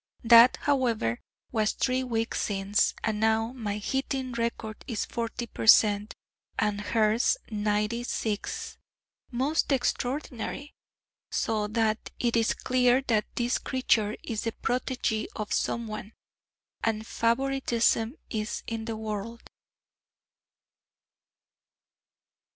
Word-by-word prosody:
That, 235 +1 +8
however, 235 - +1 0.3
was 215 -2 +1
three 260 0 0
weeks 230 -2 -1
since, 200 0 +1
and 215 -1 0
now 220 +2 +2
my 210 -5 -3
hitting 265 +3 -2
record 230 -2 -3
is 230 -5 -2
forty 235 +1 -4
per 225 - -6
cent., 210 -1 +6 0.4
and 210 -1 0
hers 220 - +2
ninety 210 +2 0
six 215 -3 -3 0.5
most 275 +6 0
extraordinary: 265 +1 -2 0.6
so 215 -3 0
that 220 0 0
it 240 -1 0
is 225 -1 +2
clear 255 0 +2
that 215 -2 +3
this 240 +1 +1
creature 225 -5 +1
is 220 -3 -3
the 230 - -2
protégée 245 -3 -1
of 215 -1 -3
someone, 215 -2 -2 0.7
and 220 -1 0
favouritism 235 -1 +1 0.2
is 215 0 -3
in 225 -1 -4
the 225 -1 -4
world. 220 +1 -5
230 Hz, 105 wpm, -28 LUFS, 215-245 Hz, 0.7 s, That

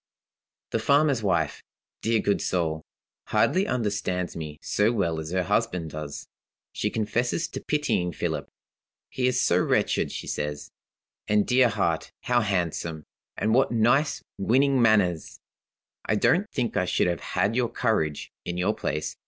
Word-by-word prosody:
"The 115 - 0
farmer's 140 0 +3
wife 85 -7 0 0.4
dear 115 0 +2
good 100 - +1
soul! 80 -3 -1 0.5
hardly 190 +2 +2
understands 100 -6 -1
me 75 -2 -6
so 105 +2 +1
well 85 -8 0
as 80 0 -5
her 90 +1 0
husband 90 -5 -1
does. 75 -2 -6 0.5
She 105 - -1
confesses 120 +9 -1
to - - -6
pitying 145 -12 0
Philip. - - -3 0.6
'He 125 -1 0
is 125 - +1
so - - +3
wretched,' - - +1
she - - -6
says. 75 0 -4 0.6
'And, 105 -1 +3
dear 125 -1 +4
heart, 85 -8 -1
how 125 -1 +2
handsome, 85 -5 -2 0.3
and 110 +2 +1
what 130 +2 +3
nice, 120 +6 +2 0.2
winning 130 +6 +3
manners! 100 -8 +2 0.6
I 110 - 0
don't 185 - +2
think 125 -4 -2
I 90 - +2
should - - +1
have 85 -2 -1 0.2
had 105 +3 +2
your 120 -2 +1
courage, 80 -11 -1
in 85 - -4
your 90 - +1
place. 75 +2 -3
105 Hz, 150 wpm, -26 LUFS, 85-120 Hz, 0.6 s, dear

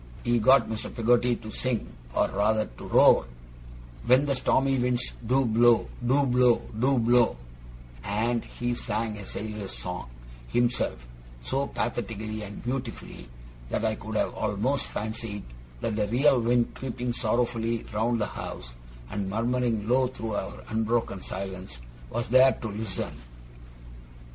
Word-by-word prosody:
He 120 0 +2
got 130 +5 +5
Mr. 110 -1 -5
Peggotty 120 +1 +3
to 110 -1 -9
sing, 120 - -2 0.3
or - - +3
rather 110 +2 +2
to - - -8
roar, - - +6 0.8
'When 130 +4 +5
the 140 - +1
stormy 135 0 +2
winds 125 0 0
do 130 +2 +3
blow, 115 +1 +4
do 135 +4 +3
blow, 125 -1 +4 0.2
do 135 +2 +3
blow'; 120 - +4 0.7
and 115 +4 0
he 120 0 -3
sang 110 -2 -2
a 100 - -8
sailor's 105 -2 -5
song 90 -8 -5 0.4
himself, 120 - 0 0.4
so 135 - 0
pathetically 110 -3 -3
and 100 -1 -8
beautifully, 120 - -5 0.4
that 110 - -1
I 110 - +2
could 110 0 -7
have - - +1
almost 110 +6 -1
fancied 110 -1 -4 0.4
that 110 - -1
the 105 -1 0
real 130 +4 +4
wind 120 +1 +2
creeping 125 -1 -3
sorrowfully 115 0 0
round 115 +2 +1
the 105 - +1
house, - - -7 0.4
and 100 -1 -2
murmuring 115 0 0
low 130 +2 +3
through 115 -3 -5
our 95 - -4
unbroken 110 -3 0
silence, 95 -8 -6 0.3
was 120 0 -2
there 130 +2 +7
to 110 - -6
listen. 105 -2 -4
115 Hz, 140 wpm, -27 LUFS, 105-125 Hz, 0.8 s, there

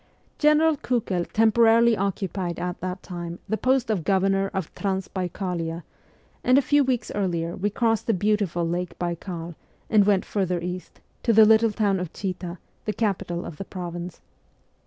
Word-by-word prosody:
General 305 +1 +4
Kiikel 205 -10 -1
temporarily 225 +1 +5
occupied 190 -3 -2
at 180 0 -3
that 185 +1 -4
time 175 -2 -6
the 220 - 0
post 255 0 +1
of 190 -6 -1
Governor 195 +1 +2
of 190 -5 -4
Transbaikalia, 180 -3 -3 0.6
and 255 +1 +5
a - - +6
few 290 +1 +4
weeks 250 -4 -1
later 170 -4 -1
we 205 +3 -1
crossed 225 +1 0
the 225 - +3
beautiful 190 -4 0
Lake 175 +1 -3
Baikal 170 -1 -4 0.4
and 205 -2 +5
went 200 -2 +3
further 185 -3 -1
east, 180 +1 -6 0.2
to 230 - +2
the 220 0 +8
little 220 +1 +5
town 205 -2 +1
of 180 -3 -5
Chita, 185 -2 -4 0.3
the 215 - -1
capital 195 -6 -2
of 150 - -8
the - - -4
province. 175 -2 -6
195 Hz, 155 wpm, -25 LUFS, 175-220 Hz, 0.6 s, the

